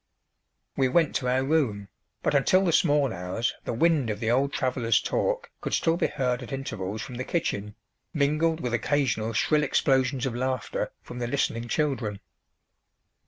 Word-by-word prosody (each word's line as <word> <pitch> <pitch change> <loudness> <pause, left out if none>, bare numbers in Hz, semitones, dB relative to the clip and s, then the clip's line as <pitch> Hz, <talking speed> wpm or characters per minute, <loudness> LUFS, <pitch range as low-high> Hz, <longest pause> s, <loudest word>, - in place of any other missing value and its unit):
We 135 - +3
went 160 +4 +2
to 125 - -4
our 130 +1 +2
room, 130 -9 0 0.4
but - - +1
until 185 +7 +4
the 170 - +2
small 145 -7 +3
hours 90 +6 -2
the - - -2
wind 150 -1 +2
of 105 -1 -3
the 115 0 0
old 135 +3 +2
traveller's 125 -4 +1
talk - - -1
could - - -1
still 165 0 +2
be - - +1
heard 125 -3 -1
at 125 - -8
intervals 110 -6 -4
from 125 - -8
the 130 - -2
kitchen, 105 - -2 0.4
mingled 155 +2 +1
with 125 -2 -2
occasional 115 -3 0
shrill 150 +8 +2
explosions 135 -2 +2
of 130 - -2
laughter 130 -1 -2
from 125 - -8
the 120 - -2
listening 120 -3 -1
children. 120 -8 -1
130 Hz, 165 wpm, -27 LUFS, 115-145 Hz, 0.4 s, until